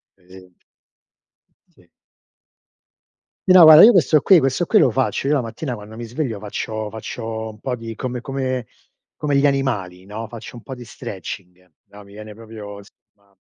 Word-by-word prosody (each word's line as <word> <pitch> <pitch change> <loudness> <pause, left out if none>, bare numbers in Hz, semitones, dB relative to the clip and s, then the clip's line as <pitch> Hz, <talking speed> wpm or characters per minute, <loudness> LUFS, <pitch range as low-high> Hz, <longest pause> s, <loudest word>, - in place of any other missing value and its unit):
pe 95 - -31
esem 90 -1 -16 1.2
Sì. - - -25 1.6
Sì, - - +9
no 185 -1 +9
guarda 155 0 +10
io 235 - +9
questo 160 - +4
qui 185 +1 +5
questo 135 +5 0
qui - - +4
lo 130 - +4
faccio. 130 +3 -1
Io 140 - +1
la 145 - +2
mattina 125 +4 -5
quando 105 0 -11
mi 120 - -7
sveglio 120 -1 -4
faccio 110 +1 -5
faccio 110 0 -6
un 105 -1 -12
po' 125 0 -3
di 115 -1 -8
come 125 +1 -5
come 130 -2 -3 0.5
come 145 -2 -1
gli 140 +1 +4
animali, 105 -11 -2
no, 105 +3 -7
faccio 115 +1 -10
un 120 - -11
po' 135 - -8
di 125 -1 -11
stretching. 90 -3 -9
No, 105 0 -15
mi 100 - -17
viene 105 +1 -10
proprio 105 -2 -10 0.3
ma 100 -1 -33
115 Hz, 180 wpm, -20 LUFS, 105-135 Hz, 1.6 s, guarda